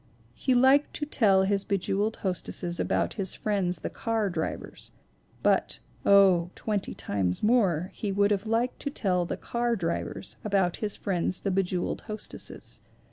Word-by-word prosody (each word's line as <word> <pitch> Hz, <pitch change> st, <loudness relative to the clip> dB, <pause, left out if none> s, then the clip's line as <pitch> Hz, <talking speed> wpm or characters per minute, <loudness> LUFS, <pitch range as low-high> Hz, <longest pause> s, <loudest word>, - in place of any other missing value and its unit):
He 260 Hz, -2 st, 0 dB
liked 265 Hz, +4 st, +4 dB
to 295 Hz, -, 0 dB
tell 200 Hz, -9 st, +3 dB
his 200 Hz, 0 st, +1 dB
be 200 Hz, -, 0 dB
jeweled 205 Hz, +4 st, -1 dB
hostesses 180 Hz, -2 st, -2 dB
about -, -, 0 dB
his 190 Hz, -, -1 dB
friends 185 Hz, -5 st, 0 dB
the -, -, -3 dB
car 225 Hz, -4 st, -1 dB
drivers; 160 Hz, -2 st, -5 dB, 0.5 s
but, -, -, +2 dB, 0.3 s
oh, 190 Hz, -4 st, +6 dB
twenty 210 Hz, -3 st, -2 dB
times 95 Hz, -3 st, -2 dB
more, 195 Hz, -7 st, +2 dB
he 205 Hz, -, -3 dB
would 200 Hz, +1 st, +2 dB
have 205 Hz, +1 st, 0 dB
liked 230 Hz, +3 st, 0 dB
to 285 Hz, -, -3 dB
tell 180 Hz, -, 0 dB
the -, -, -3 dB
car 235 Hz, 0 st, -1 dB
drivers 170 Hz, 0 st, -4 dB
about 195 Hz, -4 st, +1 dB
his 210 Hz, -2 st, -1 dB
friends 180 Hz, -2 st, -1 dB
the 195 Hz, -, -1 dB
be 195 Hz, +1 st, +3 dB
jeweled 180 Hz, -1 st, -2 dB
hostesses. 215 Hz, -1 st, -7 dB
200 Hz, 160 wpm, -27 LUFS, 180-220 Hz, 0.5 s, oh